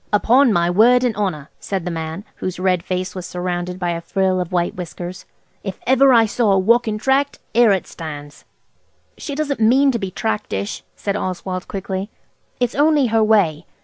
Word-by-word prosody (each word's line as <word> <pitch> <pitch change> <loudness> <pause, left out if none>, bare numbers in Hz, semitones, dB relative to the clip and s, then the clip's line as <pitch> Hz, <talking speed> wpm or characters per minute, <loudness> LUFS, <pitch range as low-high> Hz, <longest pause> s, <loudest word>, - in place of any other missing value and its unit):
"Upon 240 +5 +4
my 170 -3 +2
word 240 +8 +4
an' 240 - +1
'onner!" 185 -8 -3
said 190 -3 -4
the 180 - -2
man, 160 +4 -5
whose 185 -1 -4
red 185 -2 +1
face 185 +1 -3
was 180 -1 -6
surrounded 180 0 -3
by 175 -2 -1
a 170 0 -3
frill 185 +1 0
of 180 - -5
white 175 -1 0
whiskers. 180 0 -7 0.4
"If 195 -2 -5
ever 265 +1 +5
I 230 -2 +6
see 220 +3 -4
a 200 -4 +4
walkin' 220 +2 +2
Tract 270 +5 +1 0.2
'ere 235 -1 +5
it 190 -2 0
stands!" 145 -3 -9 0.8
"She 285 - -5
doesn't 290 -3 -2
mean 260 +5 +4
to 235 - -2
be 195 -3 -3
tractish," 105 - -3
said 200 -1 -3
Oswald 185 -1 -4
quickly; 195 -2 -4 0.5
"it's 245 -2 0
only 295 -1 +3
her 225 -1 +4
way. 185 -8 +2
190 Hz, 180 wpm, -20 LUFS, 180-235 Hz, 0.8 s, I